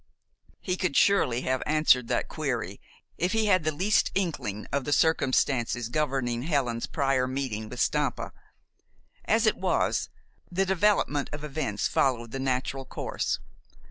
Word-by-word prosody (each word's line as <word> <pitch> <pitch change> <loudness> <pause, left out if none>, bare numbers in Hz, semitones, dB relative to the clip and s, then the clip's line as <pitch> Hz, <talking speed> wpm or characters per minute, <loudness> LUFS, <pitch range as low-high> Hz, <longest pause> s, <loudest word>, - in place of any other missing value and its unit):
He 180 -1 -2
could 180 -7 0
surely 130 -12 +3
have 130 0 -1
answered 150 -6 +4
that - - 0
query - - -3 0.4
if 180 +4 +1
he 220 -1 +2
had 185 -5 +3
the 155 - +1
least 190 +8 +2
inkling 140 - -2
of 140 -1 0
the 145 - -3
circumstances 125 -4 +1
governing 130 -4 -1
Helen's 130 -6 -1
prior 135 -3 +1
meeting 130 -5 -3
with 125 - -7
Stampa. - - 0 0.9
As - - +3
it - - +3
was, - - 0 0.4
the 190 +2 +1
development 190 -6 +1
of 150 0 -6
events 135 -8 -2
followed 120 -4 0
the 135 - -4
natural 135 +1 -1
course. - - -3
135 Hz, 140 wpm, -27 LUFS, 125-160 Hz, 0.9 s, answered